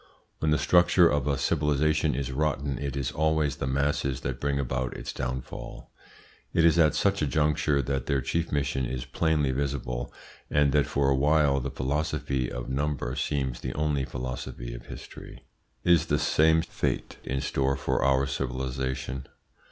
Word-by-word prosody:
When 80 Hz, -, +1 dB
the 75 Hz, -, +4 dB
structure 90 Hz, +1 st, +5 dB
of 75 Hz, -4 st, 0 dB
a 70 Hz, -2 st, +1 dB
civilisation 75 Hz, -1 st, +1 dB
is 70 Hz, 0 st, -2 dB
rotten, 70 Hz, -1 st, -1 dB
it 70 Hz, -1 st, -3 dB
is 70 Hz, -1 st, -1 dB
always 75 Hz, -1 st, +1 dB
the 65 Hz, -, -3 dB
masses 70 Hz, 0 st, 0 dB
that -, -, -3 dB
bring 70 Hz, -1 st, 0 dB
about 65 Hz, -1 st, -2 dB
its -, -, -6 dB
downfall. 65 Hz, -1 st, -6 dB, 0.6 s
It 85 Hz, -, +4 dB
is 85 Hz, 0 st, +5 dB
at 80 Hz, -2 st, +4 dB
such 100 Hz, -2 st, +1 dB
a 75 Hz, -, +2 dB
juncture 75 Hz, 0 st, +1 dB
that 70 Hz, +2 st, -2 dB
their 70 Hz, -2 st, +2 dB
chief 75 Hz, +6 st, -2 dB
mission 70 Hz, -3 st, 0 dB
is 60 Hz, 0 st, -4 dB
plainly 75 Hz, -4 st, +1 dB
visible, 65 Hz, -3 st, -3 dB, 0.4 s
and 75 Hz, -1 st, +3 dB
that 75 Hz, +1 st, +3 dB
for 70 Hz, -1 st, +1 dB
a -, -, +4 dB
while 70 Hz, 0 st, +3 dB
the 60 Hz, -, -3 dB
philosophy 70 Hz, -2 st, -1 dB
of 60 Hz, -1 st, -5 dB
number 70 Hz, -2 st, -2 dB
seems 65 Hz, -4 st, -1 dB
the 65 Hz, -, -5 dB
only 75 Hz, -2 st, 0 dB
philosophy -, -, -5 dB
of -, -, -10 dB
history. -, -, -10 dB, 0.4 s
Is 85 Hz, -2 st, +4 dB
the 75 Hz, -, +2 dB
same 80 Hz, +2 st, +3 dB
fate -, -, -3 dB
in 65 Hz, +1 st, -2 dB
store 70 Hz, 0 st, 0 dB
for 70 Hz, +1 st, -1 dB
our 70 Hz, 0 st, +3 dB
civilisation? 65 Hz, 0 st, -3 dB
70 Hz, 165 wpm, -27 LUFS, 65-75 Hz, 0.6 s, structure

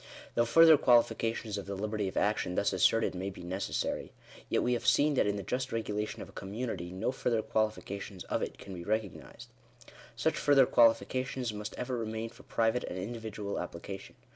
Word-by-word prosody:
Though -, -, +2 dB
• -, -, -6 dB
further 160 Hz, +4 st, +7 dB
qualifications 115 Hz, -3 st, +2 dB
of 100 Hz, -, -8 dB
the 100 Hz, -, -3 dB
liberty 105 Hz, 0 st, -2 dB
of 95 Hz, -, -5 dB
action 105 Hz, -3 st, +1 dB
thus 100 Hz, -, +1 dB
asserted 110 Hz, +5 st, +3 dB
may 95 Hz, +2 st, -3 dB
be 95 Hz, -, -10 dB
necessary, 95 Hz, +3 st, -3 dB, 0.4 s
yet -, -, +2 dB
we 125 Hz, -, +2 dB
have 120 Hz, -, -1 dB
seen 150 Hz, +1 st, +4 dB
(p. 135 Hz, -, +3 dB
89) -, -, +5 dB
that 105 Hz, -, 0 dB
in 100 Hz, -, 0 dB
the 100 Hz, -, -4 dB
just 130 Hz, +4 st, -2 dB
regu 115 Hz, -2 st, -3 dB
lation 105 Hz, +1 st, -3 dB
of -, -, -12 dB
a -, -, -13 dB
community 100 Hz, -3 st, -5 dB
no 95 Hz, +7 st, -1 dB
further 115 Hz, -4 st, 0 dB
qualifications 100 Hz, -3 st, -2 dB
of -, -, -2 dB
it -, -, -4 dB
can 95 Hz, -, -9 dB
be 85 Hz, -1 st, -7 dB
recognised. 105 Hz, -1 st, -4 dB, 0.7 s
Such -, -, 0 dB
further 140 Hz, -2 st, +5 dB
qualifications 125 Hz, +1 st, +2 dB
must 105 Hz, 0 st, -6 dB
ever 125 Hz, 0 st, -2 dB
remain 115 Hz, 0 st, -3 dB
for 120 Hz, +1 st, -16 dB
private 115 Hz, 0 st, 0 dB
and 90 Hz, -, -5 dB
individual 110 Hz, 0 st, -4 dB
application. 95 Hz, +3 st, -7 dB
110 Hz, 200 wpm, -31 LUFS, 100-120 Hz, 0.7 s, further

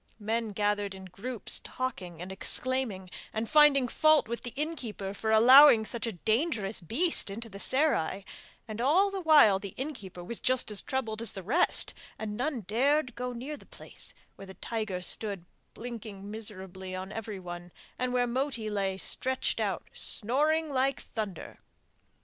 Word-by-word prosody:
Men 220 Hz, +1 st, -2 dB
gathered 205 Hz, -1 st, -1 dB
in 190 Hz, 0 st, -10 dB
groups 205 Hz, +5 st, -3 dB
talking 180 Hz, -10 st, -5 dB
and 185 Hz, -, -7 dB
exclaiming, 210 Hz, -2 st, 0 dB, 0.2 s
and 220 Hz, +1 st, -3 dB
finding 295 Hz, -3 st, +5 dB
fault 310 Hz, +3 st, +3 dB
with 235 Hz, +1 st, -4 dB
the 245 Hz, -, -6 dB
innkeeper 250 Hz, -10 st, -4 dB
for 220 Hz, +2 st, -3 dB
allowing 235 Hz, +1 st, +8 dB
such 235 Hz, 0 st, -3 dB
a 225 Hz, -, -3 dB
dangerous 220 Hz, -, 0 dB
beast 240 Hz, -, +2 dB
into 225 Hz, +4 st, -6 dB
the 200 Hz, -1 st, -10 dB
serai, 205 Hz, -, +1 dB, 0.4 s
and 215 Hz, +1 st, -5 dB
all 360 Hz, +10 st, +3 dB
the 390 Hz, -1 st, -4 dB
while 295 Hz, -, +6 dB
the 200 Hz, -2 st, -8 dB
innkeeper 220 Hz, -, -6 dB
was 230 Hz, +6 st, -4 dB
just 255 Hz, -3 st, +3 dB
as 205 Hz, -, +1 dB
troubled 225 Hz, -5 st, -3 dB
as 230 Hz, -, -1 dB
the 195 Hz, -, -7 dB
rest, 290 Hz, -, +3 dB, 0.2 s
and 210 Hz, -1 st, -5 dB
none 255 Hz, +1 st, -2 dB
dared 255 Hz, -, +1 dB
go 250 Hz, +1 st, -4 dB
near 255 Hz, +5 st, -6 dB
the -, -, -16 dB
place -, -, -5 dB, 0.2 s
where 195 Hz, -, -10 dB
the 190 Hz, -, -11 dB
tiger 215 Hz, -6 st, -4 dB
stood 200 Hz, -3 st, 0 dB, 0.3 s
blinking 215 Hz, -4 st, -8 dB
miserably 190 Hz, -3 st, -6 dB
on 190 Hz, +1 st, -6 dB
everyone, 180 Hz, -5 st, -7 dB, 0.3 s
and 255 Hz, 0 st, -1 dB
where 245 Hz, 0 st, +2 dB
Moti 245 Hz, -3 st, -2 dB
lay 195 Hz, -2 st, -1 dB
stretched 260 Hz, +6 st, -1 dB
out -, -, -2 dB
snoring 300 Hz, +7 st, +1 dB
like 270 Hz, 0 st, +1 dB
thunder. 210 Hz, -6 st, -6 dB
225 Hz, 160 wpm, -29 LUFS, 195-260 Hz, 0.4 s, allowing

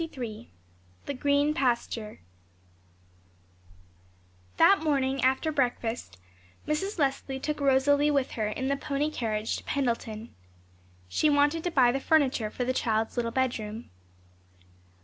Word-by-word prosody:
CHAPTER 325 Hz, -, -8 dB
XXIII 225 Hz, -1 st, -7 dB, 0.5 s
THE -, -, -3 dB
GREEN 285 Hz, +2 st, +2 dB
PASTURE 235 Hz, -, -2 dB, 2.4 s
That 395 Hz, -, +6 dB
morning, 275 Hz, -4 st, 0 dB
after 265 Hz, +5 st, +2 dB
breakfast, 245 Hz, -, -2 dB, 0.5 s
Mrs. 380 Hz, +7 st, -2 dB
Leslie 270 Hz, -2 st, -1 dB
took 300 Hz, +2 st, -3 dB
Rosalie 285 Hz, +1 st, +3 dB
with 280 Hz, -3 st, +1 dB
her 215 Hz, -2 st, -2 dB
in 260 Hz, +5 st, -3 dB
the 280 Hz, -, +1 dB
pony 290 Hz, +2 st, -2 dB
carriage 220 Hz, -5 st, -2 dB
to -, -, -10 dB
Pendleton. 230 Hz, -4 st, -3 dB, 0.7 s
She 300 Hz, -, +2 dB
wanted 290 Hz, +3 st, +2 dB
to -, -, +1 dB
buy 260 Hz, -7 st, +4 dB
the 270 Hz, -, -1 dB
furniture 270 Hz, -8 st, +2 dB
for 250 Hz, -, -4 dB
the 255 Hz, +1 st, 0 dB
child's 225 Hz, -3 st, 0 dB
little 240 Hz, -2 st, -1 dB
bedroom. 230 Hz, -3 st, -3 dB
265 Hz, 130 wpm, -28 LUFS, 230-290 Hz, 2.4 s, That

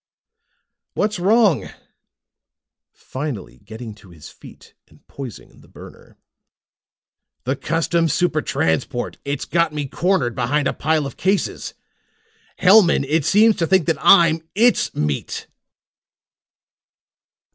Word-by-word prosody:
"What's 210 Hz, -2 st, -1 dB
wrong?" 205 Hz, -, +3 dB
Hellman -, -, -10 dB
asked, -, -, -17 dB, 1.1 s
finally 120 Hz, -, -7 dB
getting 110 Hz, +2 st, -10 dB
to 105 Hz, -3 st, -18 dB
his 80 Hz, -4 st, -13 dB
feet -, -, -16 dB
and -, -, -24 dB
poising 135 Hz, -5 st, -10 dB
the -, -, -20 dB
burner. -, -, -15 dB, 1.3 s
"The 130 Hz, +3 st, -1 dB
Custom 165 Hz, +3 st, 0 dB
Super 155 Hz, +1 st, 0 dB
Transport. 120 Hz, -, -2 dB
It's 140 Hz, 0 st, -4 dB
got 170 Hz, -2 st, 0 dB
me 150 Hz, -1 st, -3 dB
cornered 170 Hz, -6 st, 0 dB
behind 135 Hz, +4 st, 0 dB
a -, -, -1 dB
pile 155 Hz, -1 st, 0 dB
of 140 Hz, -, -8 dB
cases. 195 Hz, +2 st, -2 dB, 0.8 s
Hellman, 185 Hz, -7 st, +5 dB
it 155 Hz, 0 st, 0 dB
seems 215 Hz, +2 st, +4 dB
to 165 Hz, -4 st, 0 dB
think 190 Hz, -3 st, +2 dB
that 165 Hz, -3 st, -2 dB
I'm 170 Hz, -4 st, +5 dB
its 235 Hz, +4 st, +2 dB
meat!" 75 Hz, -1 st, -3 dB
155 Hz, 120 wpm, -20 LUFS, 125-180 Hz, 1.3 s, Hellman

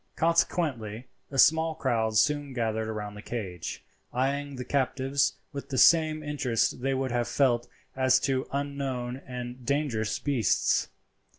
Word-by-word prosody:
Consequently 145 Hz, -9 st, 0 dB, 0.2 s
a 135 Hz, -, -6 dB
small 160 Hz, +4 st, +5 dB
crowd 115 Hz, -7 st, 0 dB
soon 145 Hz, +3 st, +2 dB
gathered 110 Hz, -2 st, -1 dB
round 105 Hz, -1 st, -5 dB
the 105 Hz, -, -8 dB
cage, 95 Hz, -8 st, -5 dB, 0.3 s
eyeing 140 Hz, +2 st, -1 dB
the 125 Hz, -1 st, -6 dB
captives 135 Hz, +1 st, +1 dB, 0.2 s
with 140 Hz, -1 st, -6 dB
the 135 Hz, -, -2 dB
same 155 Hz, -1 st, +5 dB
interest 130 Hz, -6 st, 0 dB
they 135 Hz, +1 st, 0 dB
would 130 Hz, -1 st, -1 dB
have 120 Hz, -1 st, 0 dB
felt 120 Hz, -3 st, +2 dB, 0.3 s
as 130 Hz, -1 st, +4 dB
to 135 Hz, -1 st, 0 dB
unknown 135 Hz, -3 st, -3 dB
and 125 Hz, 0 st, -6 dB
dangerous 130 Hz, -5 st, 0 dB
beasts. 130 Hz, -, +1 dB
130 Hz, 135 wpm, -28 LUFS, 120-140 Hz, 0.3 s, small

